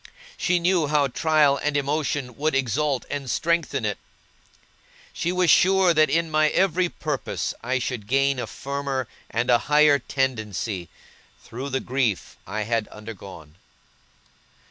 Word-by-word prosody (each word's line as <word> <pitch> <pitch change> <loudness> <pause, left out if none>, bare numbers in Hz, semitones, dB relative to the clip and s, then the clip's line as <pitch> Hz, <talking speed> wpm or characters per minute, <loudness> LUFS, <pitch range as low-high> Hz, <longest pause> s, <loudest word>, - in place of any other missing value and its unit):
She 180 - +1
knew 175 -2 +2
how 145 -2 +2
trial 150 0 +3
and 150 -1 0
emotion 140 -3 -1
would 150 +3 0
exalt 135 +1 0
and 140 -3 -4
strengthen 170 +5 0
it. - - -2 1.1
She 170 - -1
was 180 -1 +3
sure 190 -1 +5
that 155 -2 +4
in 165 +2 0
my 155 0 +3
every 185 0 +2
purpose 150 -5 -3
I 130 +3 -1
should 120 -4 -4
gain 135 +1 +2
a - - -3
firmer 140 -2 -3 0.2
and 120 +2 0
a 120 - +5
higher 150 -1 +5
tendency, 110 - -2 0.5
through 130 +4 -6
the 135 0 -1
grief 125 -7 -1
I 105 +3 -3
had 115 0 -1
undergone. 95 -7 -11
140 Hz, 140 wpm, -24 LUFS, 120-155 Hz, 1.1 s, sure